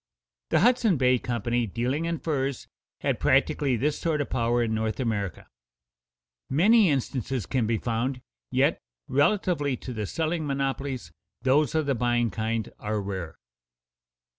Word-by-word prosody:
The 160 - +3
Hudson 230 -5 +4
Bay 125 -1 +3
Company, 120 0 -1
dealing 125 - -1
in 170 0 -1
furs, 140 -4 -2 0.3
had - - 0
practically 135 -4 +2
this 145 +5 0
sort 160 -3 0
of 145 - -3
power 120 -1 +1
in 110 -1 -1
North 110 +1 -1
America. 105 -7 -2 1.0
Many 200 - +5
instances 130 - -1
can 125 0 0
be 115 0 +1
found, 120 +3 -2 0.3
yet, - - +2 0.3
relatively 145 -2 +1
to 125 - -7
the 105 -3 -3
selling 160 - -1
monopolies, 135 - -2 0.3
those 140 +3 +3
of 155 -1 +2
the 140 - +1
buying 120 -1 +1
kind 110 +2 -2
are 105 0 -2
rare. 95 -5 -5
130 Hz, 140 wpm, -26 LUFS, 115-145 Hz, 1.0 s, Many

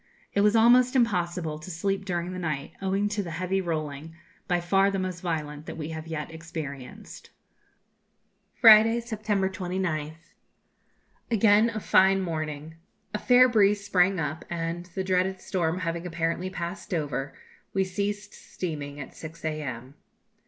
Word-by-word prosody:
It 200 - +2
was 210 +2 +4
almost 245 +3 +5
impossible 175 -9 0
to 155 - -10
sleep 195 +3 -2
during 175 -1 -2
the 185 - -5
night, 155 -4 -3
owing 195 +2 0
to 210 0 -1
the 180 - -6
heavy 185 +2 0
rolling, 155 -2 -4 0.3
by 175 -1 +2
far 195 +3 +3
the 195 - -2
most 185 -2 -3
violent 150 -3 -4
that - - -6
we 155 -1 -5
have 160 0 -6
yet 155 -1 -5
experienced. 155 -5 -8 1.3
Friday, 225 0 +7
September 215 -4 -1
29th. 175 -4 -4 1.0
Again 220 0 +4
a 220 -1 -4
fine 190 -1 +4
morning. 155 -3 -4 0.4
A 210 - -1
fair 250 +2 +6
breeze 205 -3 +3
sprang 185 -1 +3
up, 155 +1 -3
and, 170 +1 -3
the 190 - -1
dreaded 185 0 +1
storm 175 -3 -1
having 170 +1 -3
apparently 165 +2 -2
passed 175 +1 -5
over, 145 -3 -3 0.4
we 195 - +1
ceased 205 +2 -3
steaming 145 -5 -6
at 135 - -8
6 160 0 -9
a.m. 135 -5 -4
180 Hz, 145 wpm, -27 LUFS, 160-195 Hz, 1.3 s, Friday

